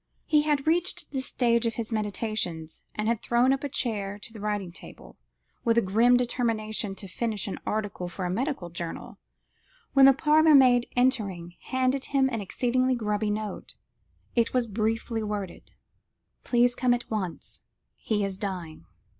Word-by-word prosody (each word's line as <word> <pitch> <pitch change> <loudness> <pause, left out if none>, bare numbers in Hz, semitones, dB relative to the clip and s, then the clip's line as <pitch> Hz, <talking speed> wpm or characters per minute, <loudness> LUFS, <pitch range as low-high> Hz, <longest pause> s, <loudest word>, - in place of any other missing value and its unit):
He 300 -2 +4
had 295 -2 0
reached 345 +3 0
this 265 -1 -2
stage 235 -1 +2
of 230 - -2
his 230 0 -4
meditations, 205 -6 -3
and 215 0 -2
had 230 -1 0
drawn 245 +3 +3
up 275 - -3
a 285 - -2
chair 205 -7 -2
to 220 +2 -10
the 220 - -9
writing 205 -3 -2
table, 175 - -12 0.5
with 230 -1 +2
a - - +6
grim 230 +6 +4
determination 220 -4 -1
to 195 - -9
finish 215 +2 -3
an 195 - -5
article 205 -4 -2
for 180 +1 -5
a - - -1
medical 230 - -2
journal, 170 -1 -6 0.7
when 270 -1 +8
the 275 - +8
parlourmaid 290 -5 +5
entering, 200 -9 0
handed 260 +1 0
him 270 -1 +2
an 225 -3 -2
exceedingly 255 +5 +1
grubby 210 -2 -1
note. 210 0 -4 0.6
It 235 +1 +1
was 250 -1 +3
briefly 225 +1 -1
worded 205 -3 -5 0.7
"Please 245 0 +3
come 245 0 +2
at 245 - -8
once. 190 -6 -4 0.4
He 210 -2 -1
is 195 -1 -4
dying." 175 - -5
225 Hz, 160 wpm, -27 LUFS, 205-255 Hz, 0.7 s, when